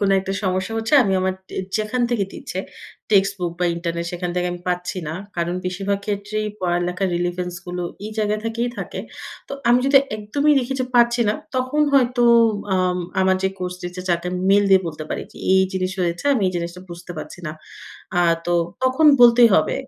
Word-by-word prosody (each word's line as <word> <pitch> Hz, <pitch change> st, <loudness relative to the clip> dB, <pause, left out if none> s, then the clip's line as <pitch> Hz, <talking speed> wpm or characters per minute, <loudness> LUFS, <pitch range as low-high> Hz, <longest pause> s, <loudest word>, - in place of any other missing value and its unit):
কোন 200 Hz, -1 st, +2 dB
একটা 195 Hz, 0 st, -4 dB
সমস্যা 190 Hz, +2 st, -1 dB
হচ্ছে 225 Hz, +6 st, 0 dB
আমি 195 Hz, -4 st, 0 dB
আমার 185 Hz, 0 st, 0 dB
ট -, -, -20 dB, 0.3 s
যেখান 220 Hz, +4 st, -1 dB
থেকে 220 Hz, -5 st, +1 dB
দিচ্ছে -, -, -7 dB, 0.5 s
text 195 Hz, -1 st, +4 dB
book 175 Hz, -2 st, -2 dB
বা, -, -, +2 dB
ইন্টারনেট 170 Hz, 0 st, -3 dB
সেখান 175 Hz, 0 st, -3 dB
থেকে 180 Hz, 0 st, 0 dB
আমি 175 Hz, -, -7 dB
পাচ্ছি 180 Hz, +1 st, -2 dB
না। 155 Hz, -, -3 dB, 0.2 s
কারণ, 170 Hz, +1 st, -1 dB
বেশিরভাগ 195 Hz, +2 st, -1 dB
ক্ষেত্রেই 210 Hz, +1 st, -2 dB
পড়ালেখার 180 Hz, +1 st, 0 dB
relevance 175 Hz, 0 st, -3 dB
গুলো 180 Hz, 0 st, -4 dB, 0.2 s
এই 215 Hz, -, -5 dB
জায়গা 210 Hz, 0 st, +1 dB
থেকেই 230 Hz, +2 st, -1 dB
থাকে। -, -, -5 dB, 0.5 s
তো -, -, -7 dB, 0.2 s
আমি 240 Hz, +1 st, +6 dB
যদি 275 Hz, -, +5 dB, 0.2 s
একদমই 280 Hz, +8 st, +1 dB
দেখি 260 Hz, 0 st, -2 dB
যে -, -, +1 dB
পারছি 240 Hz, 0 st, +4 dB
না, 210 Hz, -, +2 dB, 0.2 s
তখন 255 Hz, +4 st, +1 dB
হয়তো 250 Hz, -2 st, +3 dB, 0.5 s
আম 180 Hz, -1 st, +1 dB, 0.2 s
আমার 190 Hz, 0 st, +3 dB
যে 190 Hz, -, +2 dB
কোর্স 180 Hz, 0 st, -4 dB
টিচার, 180 Hz, +1 st, -6 dB
যাকে 170 Hz, 0 st, 0 dB
আমি 180 Hz, 0 st, -3 dB
মেইল 205 Hz, +1 st, +5 dB
দিয়ে 190 Hz, -1 st, +7 dB
বলতে 155 Hz, -1 st, -6 dB
পারি -, -, -2 dB
যে -, -, -18 dB, 0.2 s
এই 190 Hz, 0 st, +5 dB
জিনিস 185 Hz, 0 st, -1 dB
হয়েছে, 175 Hz, +3 st, -1 dB
আমি 235 Hz, -, 0 dB
এই -, -, -4 dB
জিনিসটা 170 Hz, +1 st, -5 dB
বুঝতে 175 Hz, +1 st, -8 dB
পারছি 155 Hz, +3 st, -8 dB
না। 155 Hz, -, -4 dB, 0.6 s
আ -, -, +3 dB, 0.3 s
তো 175 Hz, -, +1 dB, 0.3 s
তখন 260 Hz, +5 st, +3 dB
বলতেই 240 Hz, -1 st, +8 dB
হবে। 155 Hz, -, +2 dB
190 Hz, 195 wpm, -21 LUFS, 180-225 Hz, 0.6 s, বলতেই